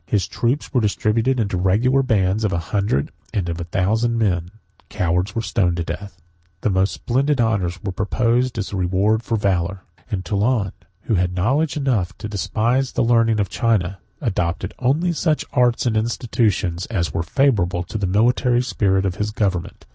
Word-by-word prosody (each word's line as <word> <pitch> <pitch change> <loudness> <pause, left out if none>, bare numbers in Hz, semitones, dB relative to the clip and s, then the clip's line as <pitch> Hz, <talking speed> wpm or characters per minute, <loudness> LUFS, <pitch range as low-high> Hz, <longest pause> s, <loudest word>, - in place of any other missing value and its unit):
His 95 -3 +1
troops 125 +8 -1
were 125 - +3
distributed 115 +4 +1
into 100 -4 0
regular 110 +9 +3
bands 105 -5 +1
of 105 - +1
a 90 - 0 0.2
hundred 100 -9 +1 0.2
and 95 -4 0
of 85 0 -3
a - - -4
thousand 110 +7 +1
men; 90 -6 0 0.4
cowards 90 +3 -1
were 115 - -1
stoned 90 -6 +1
to 85 - -1
death; 95 +1 -7 0.4
the 105 - +1
most 95 +1 +2
splendid 135 +3 0
honors 100 -6 +1
were 95 - -2
proposed 120 +6 0
as 105 - -3
the 100 - -3
reward 95 +4 +1
of 115 -2 +1
valor; 95 -1 0 0.3
and 95 -5 -3
Toulun, 100 +1 +1 0.3
who - - -1
had 90 -2 +1
knowledge 140 - +1
enough 115 -10 0
to - - -6
despise 115 +5 0
the - - +1
learning 115 -2 +3
of 100 - +1
China, 100 -5 0 0.2
adopted 95 - -1
only 150 +8 +1
such 155 -1 0
arts 125 0 +2
and 115 -3 +1
institutions 110 -5 0
as 95 -7 -2
were - - 0
favorable 90 - +1
to 105 +5 -5
the 100 - 0
military 120 +5 +2
spirit 95 -4 +1
of 95 -1 -2
his 105 +1 -1
government. 95 -5 -2
105 Hz, 175 wpm, -21 LUFS, 95-120 Hz, 0.4 s, were